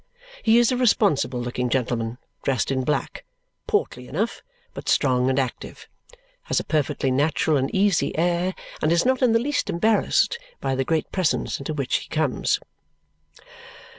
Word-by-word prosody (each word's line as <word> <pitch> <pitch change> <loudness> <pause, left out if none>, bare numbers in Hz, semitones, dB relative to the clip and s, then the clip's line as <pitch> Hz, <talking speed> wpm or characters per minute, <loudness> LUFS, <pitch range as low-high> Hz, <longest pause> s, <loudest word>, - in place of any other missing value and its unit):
He 225 0 +4
is 240 0 +4
a 250 - 0
responsible 205 - +2
looking 125 +1 -2
gentleman 120 -2 -1 0.2
dressed 135 -2 0
in 130 -1 0
black, 150 +1 -2 0.4
portly 125 0 -1
enough, 205 - -2 0.3
but - - -6
strong 130 -2 +2
and 130 - 0
active. 130 -3 -4 0.6
Has - - +1
a - - -4
perfectly 145 -3 0
natural 150 +3 +1
and 135 -1 +1
easy 195 -5 +1
air 175 +2 +1 0.3
and 155 - +2
is 170 +4 +3
not 260 0 +2
in 245 -3 +4
the - - +5
least 275 +2 -1
embarrassed 220 - +2 0.2
by 135 - -1
the 135 0 0
great 160 +2 -1
presence 185 -5 0
into 145 +3 -4
which 140 -3 0
he - - -9
comes. 155 -5 0
155 Hz, 160 wpm, -24 LUFS, 130-200 Hz, 0.6 s, the